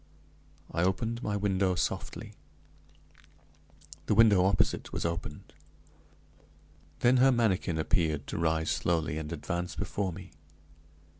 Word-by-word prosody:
I 85 Hz, -, -1 dB
opened 115 Hz, +6 st, 0 dB
my 105 Hz, -3 st, -1 dB
window 95 Hz, -2 st, +1 dB
softly; -, -, -3 dB, 1.7 s
the 105 Hz, -, +2 dB
window 105 Hz, -4 st, +6 dB
opposite 95 Hz, 0 st, +1 dB
was -, -, -3 dB
opened! 85 Hz, -3 st, -5 dB, 1.5 s
Then 125 Hz, +1 st, +5 dB
her 135 Hz, +2 st, +6 dB
manikin 105 Hz, -8 st, +1 dB
appeared 80 Hz, -2 st, 0 dB
to -, -, -4 dB
rise 80 Hz, -1 st, +1 dB
slowly 80 Hz, -3 st, 0 dB
and 75 Hz, -1 st, -6 dB
advance 85 Hz, +2 st, -4 dB
before 100 Hz, -1 st, -2 dB
me. 90 Hz, +2 st, -10 dB
90 Hz, 115 wpm, -29 LUFS, 85-105 Hz, 1.7 s, window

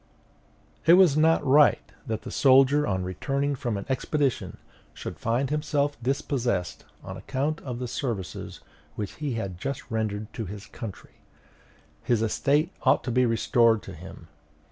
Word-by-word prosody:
It 165 Hz, -, +9 dB
was 180 Hz, -5 st, +6 dB
not 160 Hz, 0 st, +3 dB
right 145 Hz, +2 st, +4 dB, 0.2 s
that 110 Hz, -2 st, -3 dB
the -, -, -7 dB
soldier, 135 Hz, +2 st, +5 dB
on 95 Hz, -2 st, -1 dB
returning 140 Hz, -, -1 dB
from 120 Hz, -5 st, -3 dB
an 100 Hz, -, -6 dB
expedition, 135 Hz, 0 st, -1 dB, 0.4 s
should -, -, -7 dB
find 125 Hz, +4 st, 0 dB
himself 145 Hz, -1 st, 0 dB
dispossessed 125 Hz, -, -1 dB, 0.2 s
on 95 Hz, 0 st, -7 dB
account 140 Hz, -, -2 dB
of 125 Hz, -3 st, -5 dB
the 125 Hz, 0 st, -4 dB
services 110 Hz, -, -5 dB, 0.3 s
which 105 Hz, -2 st, -5 dB
he 145 Hz, -4 st, -1 dB
had 95 Hz, -6 st, -4 dB
just 135 Hz, +4 st, -4 dB
rendered 110 Hz, -1 st, -3 dB
to 110 Hz, -, -5 dB
his 100 Hz, +2 st, -8 dB
country; 110 Hz, -5 st, -10 dB, 0.8 s
his 115 Hz, -2 st, +1 dB
estate 145 Hz, +8 st, +1 dB
ought -, -, +3 dB
to 125 Hz, -, -3 dB
be 125 Hz, +1 st, +3 dB
restored 115 Hz, -1 st, +3 dB
to -, -, -9 dB
him. 85 Hz, 0 st, -11 dB
125 Hz, 150 wpm, -26 LUFS, 105-140 Hz, 0.8 s, It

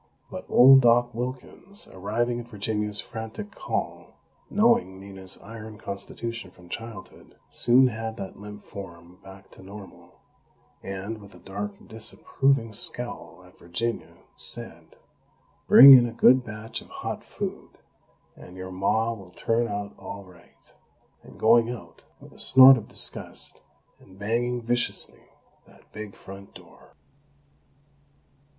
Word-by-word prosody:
But -, -, -7 dB
old 135 Hz, +2 st, +8 dB
Doc 120 Hz, 0 st, +3 dB
Wilkins, 130 Hz, -, -7 dB
arriving 120 Hz, +6 st, -2 dB
at 120 Hz, -, -9 dB
Virginia's 105 Hz, -1 st, -3 dB
frantic 110 Hz, -, -7 dB
call, -, -, -5 dB, 0.3 s
knowing 215 Hz, -, +2 dB
Nina's 95 Hz, -1 st, -5 dB
iron 110 Hz, 0 st, -10 dB
constitution 115 Hz, +4 st, -7 dB
from 90 Hz, -1 st, -19 dB
childhood, 115 Hz, -3 st, -10 dB
soon 125 Hz, +2 st, +4 dB
had 110 Hz, -1 st, -6 dB
that 95 Hz, -2 st, -8 dB
limp 105 Hz, 0 st, -10 dB
form 90 Hz, -2 st, -11 dB
back 95 Hz, 0 st, -15 dB
to -, -, -16 dB
normal; 100 Hz, +1 st, -13 dB, 0.6 s
and, 95 Hz, +3 st, -6 dB
with 100 Hz, 0 st, -15 dB
a -, -, -15 dB
dark, 100 Hz, +1 st, -6 dB
disapproving 115 Hz, +2 st, -1 dB
scowl 120 Hz, -3 st, -2 dB
at 90 Hz, -, -21 dB
Virginia, 115 Hz, +8 st, -4 dB, 0.2 s
said: -, -, -9 dB, 0.7 s
"Bring 135 Hz, +2 st, +11 dB
in 120 Hz, -2 st, +7 dB
a -, -, -6 dB
good 125 Hz, +2 st, +5 dB
batch 110 Hz, 0 st, -7 dB
of -, -, -17 dB
hot -, -, -6 dB
food, -, -, -7 dB, 0.6 s
and 90 Hz, -, -14 dB
your 95 Hz, 0 st, -7 dB
Ma 110 Hz, +5 st, 0 dB
will 100 Hz, -5 st, -12 dB
turn 115 Hz, +6 st, -1 dB
out 100 Hz, -1 st, -5 dB
all 100 Hz, -, -8 dB
right," 90 Hz, -2 st, -21 dB, 0.5 s
and -, -, -16 dB
going 115 Hz, +1 st, +4 dB
out, 120 Hz, -2 st, -9 dB, 0.2 s
with -, -, -16 dB
a -, -, -16 dB
snort 130 Hz, +1 st, +9 dB
of 115 Hz, -, -7 dB
disgust, -, -, -2 dB, 0.4 s
and 95 Hz, -, -19 dB
banging 120 Hz, +4 st, -2 dB
viciously 120 Hz, +1 st, 0 dB, 0.4 s
that -, -, -23 dB
big 110 Hz, -2 st, -8 dB
front 95 Hz, +1 st, -13 dB
door! -, -, -17 dB
110 Hz, 130 wpm, -25 LUFS, 100-120 Hz, 0.7 s, Bring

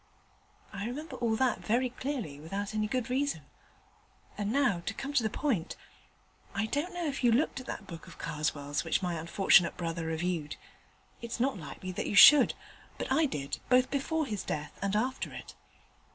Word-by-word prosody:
I 200 Hz, +1 st, -4 dB
remember 285 Hz, +3 st, -6 dB
all 230 Hz, -2 st, +1 dB
that 255 Hz, +2 st, +1 dB
very 245 Hz, +3 st, 0 dB
clearly, 245 Hz, -, -4 dB
without 195 Hz, +7 st, -4 dB
any 215 Hz, 0 st, 0 dB
good 250 Hz, 0 st, -2 dB
reason; 280 Hz, +2 st, 0 dB, 0.9 s
and 205 Hz, 0 st, -2 dB
now 250 Hz, -8 st, +2 dB
to -, -, -2 dB
come 275 Hz, +1 st, -5 dB
to 285 Hz, -, +4 dB
the 220 Hz, -, 0 dB
point. 215 Hz, -, -1 dB, 0.8 s
I 200 Hz, +1 st, +1 dB
don't 290 Hz, +10 st, -2 dB
know 350 Hz, -1 st, -2 dB
if 280 Hz, -3 st, -3 dB
you 240 Hz, -, +5 dB
looked 270 Hz, +4 st, +1 dB
at 255 Hz, -, -10 dB
that 210 Hz, -, -5 dB
book 170 Hz, -1 st, -10 dB
of 170 Hz, -, -12 dB
Karswell's 150 Hz, -2 st, -2 dB
which 165 Hz, +3 st, 0 dB
my 175 Hz, -1 st, -1 dB
unfortunate 170 Hz, +2 st, +3 dB
brother 165 Hz, -1 st, -3 dB
reviewed. 160 Hz, -2 st, -2 dB, 0.7 s
It's 235 Hz, 0 st, -5 dB
not 260 Hz, +1 st, +1 dB
likely 185 Hz, +4 st, -7 dB
that 180 Hz, -, -3 dB
you -, -, -2 dB
should: 295 Hz, +7 st, +9 dB, 0.4 s
but -, -, -4 dB
I 305 Hz, +3 st, +4 dB
did, 140 Hz, -, -4 dB
both 255 Hz, 0 st, +4 dB
before 310 Hz, +3 st, 0 dB
his 210 Hz, -7 st, -3 dB
death 150 Hz, 0 st, -4 dB
and 200 Hz, +1 st, 0 dB
after 255 Hz, +5 st, -1 dB
it. -, -, -9 dB
215 Hz, 180 wpm, -30 LUFS, 170-265 Hz, 0.9 s, should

